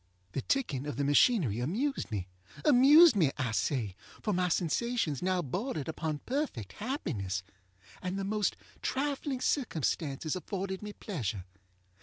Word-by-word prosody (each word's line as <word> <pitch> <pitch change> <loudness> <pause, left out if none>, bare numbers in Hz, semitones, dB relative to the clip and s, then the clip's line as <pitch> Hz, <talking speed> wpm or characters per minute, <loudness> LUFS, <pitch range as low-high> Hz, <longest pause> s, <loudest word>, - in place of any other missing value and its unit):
The 135 - -2
ticking 145 - -1
of 145 - -3
the 140 - -1
machinery 145 - +4
amused 225 - -1
me. 100 -5 -3 0.4
Amused 295 +3 +8
me, 160 -9 +3
I 130 -5 -1
say, 115 -4 -1 0.3
for 210 - +1
my 180 0 +1
sensations 175 - 0
now 185 -1 +1
bordered 160 - -3
upon 155 -2 -3
perfect 255 - -2
happiness, 110 - -3 0.6
and 185 +1 -3
the 195 - -2
most 210 +1 0 0.3
trifling 275 -1 -1
circumstances 155 - 0
afforded 190 +1 -4
me 210 0 -6
pleasure. 110 - -4
180 Hz, 135 wpm, -31 LUFS, -, 0.6 s, Amused